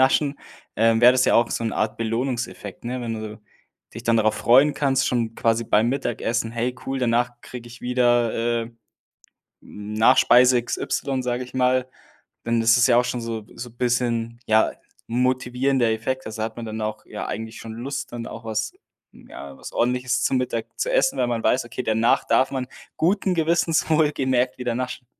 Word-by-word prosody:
Naschen, 140 +2 +2 0.4
ähm, 115 0 +3
wäre 120 +1 +8
das 130 0 +2
ja - - +3
auch 115 0 +3
so 115 - -2
'n 115 - -1
Art 110 0 -1
Belohnungseffekt, 115 -2 -3
ne? 125 +2 -3
Wenn 115 -2 -3
du 110 0 -7 0.5
dich 115 - -7
dann 115 -1 +2
darauf 110 -1 +2
freuen 135 +5 +4
kannst, 135 -2 +1
schon 115 -2 -1
quasi 115 0 +1
beim 110 +1 +2
Mittagessen: 120 -3 -2
„Hey, 120 +2 -2
cool, 135 0 -3
danach 120 0 +1
kriege 120 -1 -10
ich 120 +1 -13
wieder, 120 -2 +1
äh, 115 - -12 0.9
Nachspeise 115 +4 +3
XY,“ 130 +2 -2
sage 125 0 -2
ich 125 - -13
mal, 130 0 +2 0.6
denn 115 0 +1
das 115 +1 +5
ist 120 - +4
ja 120 -2 +4
auch 125 - +3
schon 125 -1 -3
so 115 -2 -5
so 120 - -7
bisschen, 120 -1 -1
ja, 110 0 +4 0.4
'n 120 +2 0
motivierender 130 -1 +1
Effekt, 130 +4 -3
also, 110 +1 -7
da - - +1
hat 110 0 -7
man 120 - -5
dann 110 0 -5
auch 110 0 -4
ja - - -6
eigentlich 110 0 -6
schon 115 - -8
Lust, 130 +3 -5
dann 120 -1 -6
auch 115 0 -9
was 110 -1 -2 0.4
ja, 70 -1 -11
was - - -9
Ordentliches 125 +1 0
zu - - +1
Mittag 125 -3 -2
zu - - 0
essen, - - +2
weil 125 - +2
man 120 -1 -1
weiß, 125 -1 +2
okay, 120 +2 -5
danach 110 +2 +2
darf 130 - +2
man 130 -2 -3 0.3
guten 190 +3 +1
Gewissens 165 -1 +1
wohl 155 -1 +3
gemerkt 130 -3 0
wieder 125 -2 -2
naschen. 125 0 -4
120 Hz, 190 wpm, -23 LUFS, 115-130 Hz, 0.9 s, wäre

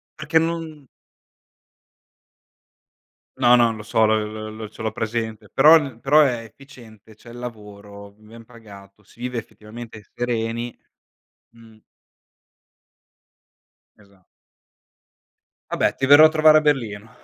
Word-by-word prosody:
Perché 155 +1 -1
non 160 -4 -5 2.5
No, 125 -2 +4
non 115 -2 +2
lo 105 - -10
so 110 +1 +1
l 110 0 -3
l 110 - -9
l 105 - -8
ce - - -13
l'ho 110 0 -2
presente, 110 -1 -5
però 145 -4 +4
però 145 +5 +4
è 125 -6 0
efficiente, 115 -3 -17
c'è 115 +2 -16
il 120 - -12
lavoro, 105 -3 -11
ben 110 +2 -16
pagato, 105 -4 -16
si 105 - -24
vive 125 0 -5
effettivamente 110 0 -12
sereni 120 0 -4 0.8
mh. 115 -1 -18 2.2
Esatto. 100 -3 -25 1.4
Vabbè - - 0
ti 135 - -2
verrò 145 +3 +8
a - - +6
trovare 155 -1 +5
a - - -6
Berlino. 115 -8 -2
115 Hz, 120 wpm, -21 LUFS, 110-135 Hz, 2.5 s, verrò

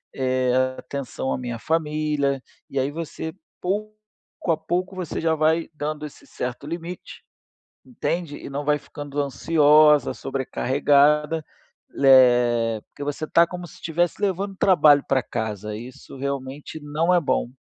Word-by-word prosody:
eh, 130 -1 +1 0.3
atenção 130 0 -4
à - - 0
minha 120 -2 -5
família." 150 -3 0 0.3
E 135 - -2
aí, 135 +2 0
você, 160 0 -5 0.3
pouco 210 +3 -2 0.6
a 160 - +2
pouco, 180 +4 -2
você 180 -4 -4
já 160 -1 +2
vai 160 +2 +1
dando 150 0 -4
esse - - -16
certo 125 +2 -5
limite, 170 +3 -7 0.6
entende? 175 - -3
E - - -8
não 145 +1 -4
vai 150 0 +3
ficando 145 0 -8
ansiosa, 150 +1 +4
sobrecarregada, 145 +4 +2 0.6
eh, 120 -4 +5
porque 145 - -11
você 145 +2 -3
está 170 +2 +4
como 180 0 -7
se - - -15
tivesse 170 +3 -1
levando 195 0 -1
trabalho 150 -7 +5
para 130 -1 +2
casa, 105 -2 -4
isso 125 +4 -10
realmente 140 +2 -5
não 160 +5 +1
é 175 - +4
bom. 135 - 0
150 Hz, 140 wpm, -23 LUFS, 135-165 Hz, 0.6 s, eh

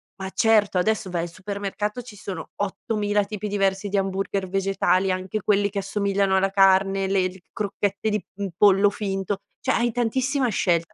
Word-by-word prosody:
ma 190 -1 -6
certo, 210 -3 +3
adesso 215 +1 +1
vai 170 -1 -1
al - - -3
supermercato, 200 +4 -4
ci 220 -3 -12
sono 185 -4 -7
8000 205 0 -1
tipi 210 0 -5
diversi 195 0 0
di 200 - 0
hamburger 195 0 -1
vegetali, 195 0 +1
anche 185 +3 -3
quelli 205 0 +2
che 200 - -2
assomigliano 195 -1 +1
alla 195 0 +2
carne, 195 0 +4
le 190 -1 +2
l 185 +1 -10
crocchette 205 0 -2
di, 210 -4 -1
mhmm, 200 -1 -3
pollo 200 0 +5
finto. 195 -1 -3 0.2
Cioè - - 0
hai 240 0 +1
tantissima 255 +3 0
scelta. 170 -4 0
195 Hz, 170 wpm, -24 LUFS, 190-210 Hz, 0.2 s, pollo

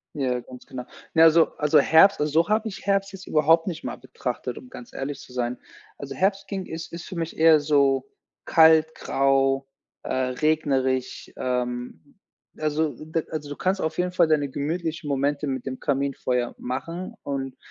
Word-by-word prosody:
Ja, 125 -3 -1
ganz 125 +1 -13
genau. 125 -1 -7 0.3
Ne, 160 - +6
also 165 0 +7
also, 150 0 +4
Herbst 160 +7 +6
also, 150 0 0
so 170 - -14
habe 215 +1 +1
ich 190 - -9
Herbst 195 0 +1
jetzt 195 0 -10
überhaupt 160 +2 +3
nicht 170 -4 -4
mal - - -5
betrachtet, - - -5
um 255 - -14
ganz 245 -1 -11
ehrlich 140 +1 -4
zu - - -14
sein. 125 0 -2 0.4
Also, 140 -1 -7
Herbst 195 +6 0
ging 195 -2 -4
ist 160 +1 -7
ist 170 +1 -7
für 185 - -8
mich 165 -1 -4
eher 160 -1 +6
so 140 -2 +2 0.4
kalt, 160 -1 +5
grau, 135 0 +1 0.4
äh, - - -4
regnerisch, 130 0 0
ähm, 125 -7 -4 0.4
also, 155 0 0 0.2
da 160 +1 -1
also, 155 -2 -5
du 145 - -6
kannst 190 +1 0
auf 160 0 -2
jeden 180 0 -1
Fall 175 -2 +3
deine 145 -3 +1
gemütlichen 155 +2 -3
Momente 140 +2 0
mit 130 -2 -3
dem 130 -1 -5
Kaminfeuer 135 -3 -1
machen 165 - -5
und 135 -2 -4
150 Hz, 175 wpm, -25 LUFS, 135-165 Hz, 0.4 s, also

